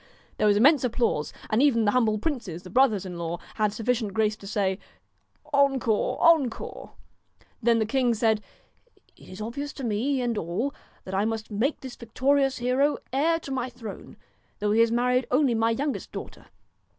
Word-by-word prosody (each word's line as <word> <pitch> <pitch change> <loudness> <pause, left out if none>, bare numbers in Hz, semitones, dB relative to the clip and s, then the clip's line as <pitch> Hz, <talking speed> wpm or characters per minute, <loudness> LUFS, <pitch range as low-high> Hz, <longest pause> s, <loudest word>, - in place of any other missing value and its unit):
There 215 - +3
was 205 -1 +4
immense 280 +6 +5
applause, 230 -10 0 0.2
and 215 +3 +3
even 240 -6 +3
the 205 - +3
hum 250 0 +3
bled 215 -1 -1
princes, 220 - -3
the 185 - -11
brothers 220 -5 +3
in 180 -2 -6
law, 170 0 -3 0.2
had 210 -1 +2
sufficient 225 -2 -1
grace 215 -1 +2
to 195 - -11
say: 195 -2 -1 0.4
' 295 0 -29
Encore, 270 -6 +2
encore! 310 -8 +1 0.3
' - - -35
Then 235 0 +3
the 220 - +1
king 245 0 +1
said: 220 -1 +2 0.4
' - - -42 0.3
It - - -17
is 185 +3 -9
obvious 280 +7 -5
to 275 - -8
me 245 +5 0
and 240 -2 0
to 215 - -2
all, 190 - -2 0.3
that 190 - -8
I 195 +2 +1
must 225 0 -3
make 235 +9 -1
this 260 -2 -8
victorious 270 +4 +1
hero 255 +4 +1 0.2
heir 320 +5 +2
to 275 - -8
my 255 -1 -2
throne, 235 -5 -10 0.4
though 210 0 0
he 220 - +3
has 230 0 +4
married 250 +2 +1
only 260 -1 +3
my 225 0 +2
youngest 275 +5 -2
daughter. - - -9
230 Hz, 195 wpm, -26 LUFS, 210-265 Hz, 0.4 s, immense